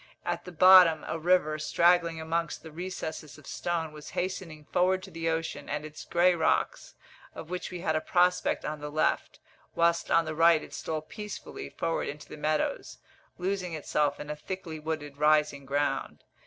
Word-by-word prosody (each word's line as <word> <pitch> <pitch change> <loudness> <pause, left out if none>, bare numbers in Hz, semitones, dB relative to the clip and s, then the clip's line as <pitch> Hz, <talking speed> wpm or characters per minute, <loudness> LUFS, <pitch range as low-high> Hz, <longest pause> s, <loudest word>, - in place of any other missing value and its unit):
At - - -2
the 180 - -8
bottom, 180 -2 +7
a 160 +1 -3
river, 155 -2 +2
straggling 170 +1 +3
amongst 165 +1 -2
the 160 - -10
recesses 160 -4 -6
of - - -16
stone, 165 -2 -2
was 150 -1 -10
hastening 170 -4 -4
forward 185 +1 +2
to - - -10
the 165 0 -2
ocean 160 0 -3
and 150 +1 -3
its 155 0 -9
grey 180 +1 +4
rocks, 160 -2 0 0.4
of 165 - -9
which 180 - -3
we 180 -2 -6
had 160 -3 0
a 155 - +1
prospect 180 +2 +2
on 150 0 -3
the 150 0 -5
left; 155 +1 0 0.4
whilst 170 0 +2
on 165 0 +4
the 155 - -3
right 165 0 +5
it - - -12
stole 155 -1 -3
peacefully 210 +5 -7
forward 165 - -2
into 145 +1 -7
the - - -9
meadows, 155 - -1 0.4
losing 185 -1 -2
itself 150 -1 0
in 150 0 -5
a - - -3
thickly 165 0 -6
wooded 150 -2 -5
rising 150 -2 +2
ground. 145 +1 -1
160 Hz, 180 wpm, -29 LUFS, 155-175 Hz, 0.4 s, bottom